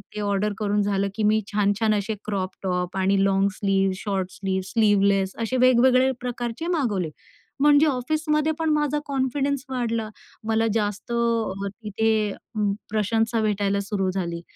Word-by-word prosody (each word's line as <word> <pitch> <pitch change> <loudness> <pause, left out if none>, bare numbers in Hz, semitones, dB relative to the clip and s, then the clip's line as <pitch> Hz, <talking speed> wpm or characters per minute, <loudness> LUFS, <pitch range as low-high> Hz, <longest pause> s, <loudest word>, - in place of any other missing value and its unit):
ते - - -4
ऑर्डर 205 +1 0
करून 205 -1 +1
झालं, 200 -1 0
की 220 - -2
मी 215 +1 +3
छान-छान 210 +1 +2
असे 205 +1 -2
क्रॉप-टॉप 185 -2 -3
आणि 195 +1 +2
long 195 0 +3
slew, 195 -1 +1
short 190 -2 -3
slew, 190 -1 -2
sleeveless 200 -2 +2
असे 230 +3 -1
वेगवेगळे 255 +1 +5
प्रकारचे 245 +4 -4
मागवले. 205 - -1 0.5
म्हणजे 295 +1 +6
ऑफिसमध्ये 305 +3 0
पण 320 -1 0
माझा 295 -1 +1
कॉन्फिडन्स 275 0 -1
वाढला. 230 -4 -2 0.4
मला 225 0 +2
जास्त 210 0 -2
तिथे 220 -1 0 0.6
प्रशंसा 225 +2 0
भेटायला 200 -1 0
सुरू 195 -1 -1
झाली 170 -3 -3
215 Hz, 130 wpm, -24 LUFS, 195-245 Hz, 0.6 s, म्हणजे